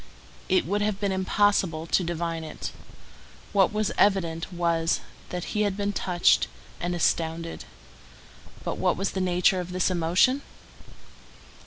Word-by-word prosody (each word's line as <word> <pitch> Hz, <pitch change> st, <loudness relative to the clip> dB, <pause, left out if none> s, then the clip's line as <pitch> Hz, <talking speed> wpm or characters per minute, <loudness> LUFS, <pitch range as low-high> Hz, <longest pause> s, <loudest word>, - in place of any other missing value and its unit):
It 185 Hz, -, +3 dB
would 205 Hz, +4 st, 0 dB
have 205 Hz, -1 st, 0 dB
been 200 Hz, -1 st, 0 dB
impossible 190 Hz, -3 st, +1 dB
to 180 Hz, -, +2 dB
divine 170 Hz, -1 st, -3 dB
it. 155 Hz, -, -6 dB, 0.8 s
What 195 Hz, -3 st, +4 dB
was 215 Hz, -1 st, 0 dB
evident 170 Hz, -4 st, +2 dB
was, 170 Hz, -2 st, +1 dB, 0.3 s
that 180 Hz, -1 st, -5 dB
he 210 Hz, -, +2 dB
was 205 Hz, 0 st, -1 dB
touched 180 Hz, -3 st, +3 dB, 0.3 s
and 175 Hz, +1 st, -2 dB
astounded. 165 Hz, 0 st, -1 dB, 1.0 s
But -, -, -3 dB
what -, -, +2 dB
was 195 Hz, +1 st, -1 dB
the 190 Hz, -, -2 dB
nature 180 Hz, +1 st, +3 dB
of 180 Hz, 0 st, -5 dB
this 185 Hz, +1 st, +1 dB
emotion? 180 Hz, +11 st, +3 dB
180 Hz, 135 wpm, -26 LUFS, 170-200 Hz, 1.0 s, What